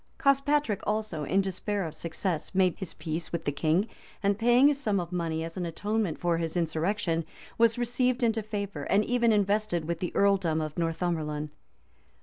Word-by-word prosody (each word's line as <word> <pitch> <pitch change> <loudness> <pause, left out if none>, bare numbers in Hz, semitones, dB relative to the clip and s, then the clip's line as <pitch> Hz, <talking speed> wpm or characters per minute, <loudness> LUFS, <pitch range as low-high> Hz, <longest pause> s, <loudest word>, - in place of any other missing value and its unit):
[] - - -39
Cospatric 275 -5 +3
also, 210 -8 -1
in 195 +7 +2
despair 195 +1 -2
of 160 - -5
success, 170 +2 -3
made 185 -2 +3
his 190 -4 -6
peace 160 0 -4
with 170 - -3
the 145 - +1
king, 160 +8 +1 0.4
and 200 +1 +2
paying 245 +5 +6
a - - +2
sum 220 -8 0
of 175 0 -5
money 165 -2 -1
as 165 +2 -7
an 180 - -2
atonement 205 0 -1
for 170 -1 +1
his 165 +1 -2
insurrection, 165 +1 0 0.4
was 230 0 +4
received 245 +1 0
into 225 -1 +2
favor, 200 -8 -4
and 205 +1 +3
even 235 -1 +3
invested 205 -4 +1
with 170 0 -2
the 180 - -2
earldom 190 -5 +3
of 155 -1 -4
Northumberland. 160 -3 -2
185 Hz, 180 wpm, -28 LUFS, 165-215 Hz, 0.4 s, paying